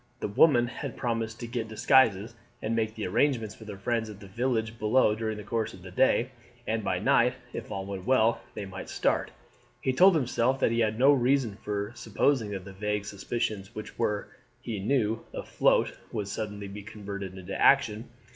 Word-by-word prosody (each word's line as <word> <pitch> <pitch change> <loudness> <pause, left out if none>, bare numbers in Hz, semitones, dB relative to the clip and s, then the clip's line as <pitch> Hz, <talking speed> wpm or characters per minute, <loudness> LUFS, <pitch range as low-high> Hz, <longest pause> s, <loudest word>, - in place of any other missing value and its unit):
The - - -2
woman 120 +3 +5
had 120 - -6
promised 115 -3 -2
to - - -3
get 115 -1 -3
disguises, 110 -2 +3 0.3
and 110 +1 -2
make 110 -1 -1
the 110 - -4
arrangements 115 +1 0
with 110 -1 -10
her 100 - -6
friends 110 +2 -1
at 105 -2 -10
the 105 - -11
village 115 +1 -2
below 110 +1 +4
during 110 0 -3
the 105 - -7
course 115 +1 -2
of 90 - -15
the 95 - -9
day, 130 +4 +3 0.3
and 110 0 -1
by - - 0
night, - - +3 0.2
if - - -6
all 95 0 -4
went 95 -2 -6
well, 115 -3 +3
they 105 - -4
might 95 0 -8
start. - - 0 0.5
He 130 - 0
told 185 +6 +6
himself 130 -2 +1
that 115 - +2
he 115 - +1
had 110 -1 +1
no 135 +4 +6
reason 130 -4 +2
for 105 0 -2
supposing 120 -1 +1
that 95 -3 -5
the 100 - -9
vague 105 +1 -2
suspicions 100 0 -3
which 110 - -8
were, 105 -1 -1 0.3
he 115 -4 -5
knew, 115 0 0
afloat - - +2 0.2
would 105 -2 -3
suddenly 105 0 -4
be 100 +1 -8
converted 100 -2 -7
into 90 -1 -7
action. 110 +4 +3
110 Hz, 195 wpm, -28 LUFS, 100-120 Hz, 0.5 s, told